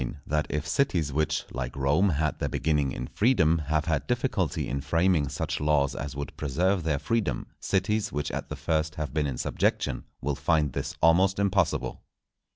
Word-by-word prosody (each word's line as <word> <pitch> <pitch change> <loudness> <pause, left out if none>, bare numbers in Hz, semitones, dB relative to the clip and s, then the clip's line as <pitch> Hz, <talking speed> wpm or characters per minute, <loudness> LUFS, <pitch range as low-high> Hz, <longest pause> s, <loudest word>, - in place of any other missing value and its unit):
—_That 75 0 0
if 75 +1 -2
Cities 85 - +1
which, 80 +1 0
like 65 -1 -4
Rome, 70 +8 +3
had 80 -1 0
their - - -1
beginning 75 -3 +1
in 65 - -4
Freedom, 85 - +3
have 75 0 +1
had 80 -3 -1
difficulty - - 0
in 70 +1 -2
framing 80 +1 +2
such 80 +4 -3
Laws 75 -2 +2
as 70 -1 -5
would 70 -2 -5
preserve 90 +7 +1
their 80 -3 0
Freedom, 100 - -1
Cities 105 +2 0
which 75 -1 -2
at - - -4
the - - -4
first 80 -1 -1
have 75 -4 -4
been 75 -1 +1
in 65 -3 -3
Subjection - - 0
will 70 +2 -1
find 75 0 +1
this - - -4
almost 95 +4 +5
impossible. 100 -3 0
75 Hz, 175 wpm, -27 LUFS, 70-85 Hz, -, almost